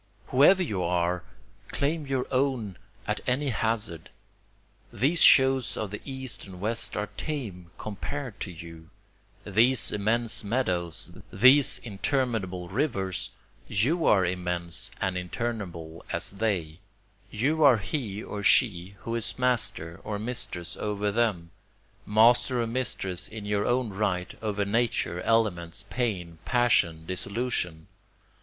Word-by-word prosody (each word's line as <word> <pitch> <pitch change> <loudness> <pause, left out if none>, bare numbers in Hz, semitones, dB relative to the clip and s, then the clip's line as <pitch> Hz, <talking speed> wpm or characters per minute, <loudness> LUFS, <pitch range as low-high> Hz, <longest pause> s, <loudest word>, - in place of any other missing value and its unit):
Whoever 180 +8 +6
you 105 - -2
are! 90 0 0 0.4
claim 150 +1 -1
your 135 -2 0
own 130 -8 0 0.3
at - - -2
any 135 +3 +1
hazard! 110 -8 -2 0.8
These 155 +6 +1
shows 130 -2 +5
of 105 -3 -3
the 105 - -6
east 130 -7 -5
and 90 -2 -10
west 110 +4 0
are 105 0 -2
tame, 105 - -4
compared 120 +3 -5
to - - -4
you; 85 -1 -11 0.6
These 115 +5 +3
immense 110 +3 0
meadows 90 -8 -1 0.2
these 130 +7 +6
interminable 105 -5 -2
rivers 95 - -1 0.4
you 150 - +1
are 95 -3 +5
immense 90 -1 -2
and 95 -1 -1
interminable 90 -4 -4
as - - 0
they; 95 -6 -2 0.5
You 150 +9 +1
are 135 -5 +7
he 110 -2 -4
or 105 - -5
she 100 -4 +3
who 115 - -4
is 115 -2 -2
master 110 -10 +1
or 105 -1 -3
mistress 100 -6 -4
over 105 -1 -1
them, 100 -7 0 0.6
Master 120 +4 +4
or 120 - +1
mistress 105 -7 -2
in 110 -2 -8
your 105 0 0
own 125 -1 +1
right 95 -2 -1
over 105 -2 -1
Nature, 105 -5 0
elements, 95 -5 0
pain, 90 -10 -2
passion, 95 -10 +2
dissolution. 95 -3 -3
105 Hz, 125 wpm, -27 LUFS, 90-125 Hz, 0.8 s, are